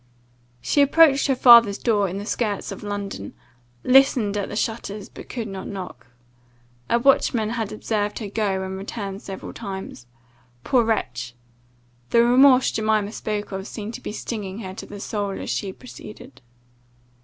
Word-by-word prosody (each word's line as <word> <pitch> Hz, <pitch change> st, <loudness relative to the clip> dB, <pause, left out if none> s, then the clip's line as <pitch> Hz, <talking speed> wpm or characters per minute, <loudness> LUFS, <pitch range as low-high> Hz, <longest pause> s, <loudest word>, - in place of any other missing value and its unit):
"She 290 Hz, -, +3 dB
approached 285 Hz, 0 st, +5 dB
her 270 Hz, -, +2 dB
father's 235 Hz, -5 st, +7 dB
door, 205 Hz, -5 st, +1 dB
in 185 Hz, -, -5 dB
the 200 Hz, -, -5 dB
skirts 210 Hz, -3 st, -2 dB
of 195 Hz, -, -7 dB
London, 200 Hz, -, -5 dB, 0.5 s
listened 255 Hz, -5 st, +4 dB
at 205 Hz, -2 st, -2 dB
the -, -, -6 dB
shutters, 215 Hz, -2 st, -3 dB
but -, -, -12 dB
could 235 Hz, -3 st, -4 dB
not 195 Hz, -2 st, -7 dB
knock. 180 Hz, -, -8 dB, 0.8 s
A -, -, +4 dB
watchman 235 Hz, -3 st, +2 dB
had 225 Hz, -3 st, -3 dB
observed 210 Hz, -1 st, -2 dB
her 215 Hz, -, -5 dB
go 200 Hz, -2 st, -1 dB
and 190 Hz, 0 st, -5 dB
return 195 Hz, -1 st, -5 dB
several 195 Hz, -2 st, -8 dB
times 190 Hz, -, -7 dB, 0.6 s
Poor 250 Hz, -3 st, +3 dB
wretch! 125 Hz, -, -2 dB, 0.7 s
[The 235 Hz, -, +5 dB
remorse 255 Hz, +2 st, +5 dB
Jemima 215 Hz, -1 st, 0 dB
spoke 210 Hz, -2 st, -4 dB
of, 190 Hz, +1 st, -5 dB
seemed 215 Hz, +1 st, -6 dB
to -, -, -8 dB
be -, -, -5 dB
stinging 210 Hz, -3 st, -5 dB
her 185 Hz, -3 st, -7 dB
to -, -, -9 dB
the 205 Hz, -, -9 dB
soul, 205 Hz, -1 st, -3 dB
as -, -, -4 dB
she 195 Hz, -, -2 dB
proceeded. 210 Hz, -, -12 dB
210 Hz, 160 wpm, -23 LUFS, 195-235 Hz, 0.8 s, father's